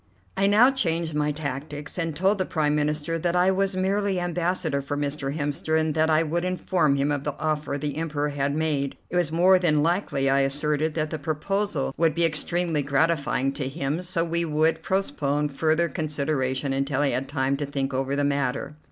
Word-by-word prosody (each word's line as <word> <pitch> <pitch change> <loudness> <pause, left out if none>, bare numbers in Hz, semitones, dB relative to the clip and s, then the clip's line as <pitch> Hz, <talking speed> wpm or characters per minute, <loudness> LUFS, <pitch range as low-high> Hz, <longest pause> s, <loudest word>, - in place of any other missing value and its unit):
I 195 +1 +2
now 220 +6 +6
changed 165 - -1
my 150 0 +1
tactics, 145 0 -5
and 165 -3 -2
told 190 +5 +2
the - - +2
Prime 150 -4 0
Minister 150 +2 -1
that 175 +2 0
I 180 +1 +4
was 195 0 0
merely 195 0 0
Ambassador 175 -4 -1
for 145 +1 -4
Mr. 145 0 -2
Hemster, 150 +2 0
and 155 -1 0
that 160 +1 +2
I 155 +1 +4
would 170 +2 -1
inform 180 -5 +1
him 140 +1 +1
of 145 -1 -1
the 145 -1 -3
offer 155 -2 -1
the 145 0 -3
Emperor 150 -2 -1
had 140 0 -1
made. 150 -3 -1
It - - -3
was 175 -4 +1
more 180 +3 +5
than 155 -4 +2
likely, 165 -5 0
I 135 +1 +3
asserted, 150 +3 +1
that 155 -2 -1
the 155 - -3
proposal 155 0 -2
would 165 0 +2
be 170 0 +3
extremely 165 0 0
gratifying 140 -1 +1
to 135 -2 -3
him; 140 +3 -2
so 175 -2 -1
we 170 0 0
would 160 0 +1
postpone 150 -6 -1
further 160 +4 +1
consideration 140 -3 -1
until 135 +1 0
he 140 - +2
had 135 +1 -2
time 135 -1 0
to 145 - -2
think 135 -1 -2
over 135 +1 -1
the 145 - 0
matter. 140 +1 -1
150 Hz, 195 wpm, -25 LUFS, 140-170 Hz, -, now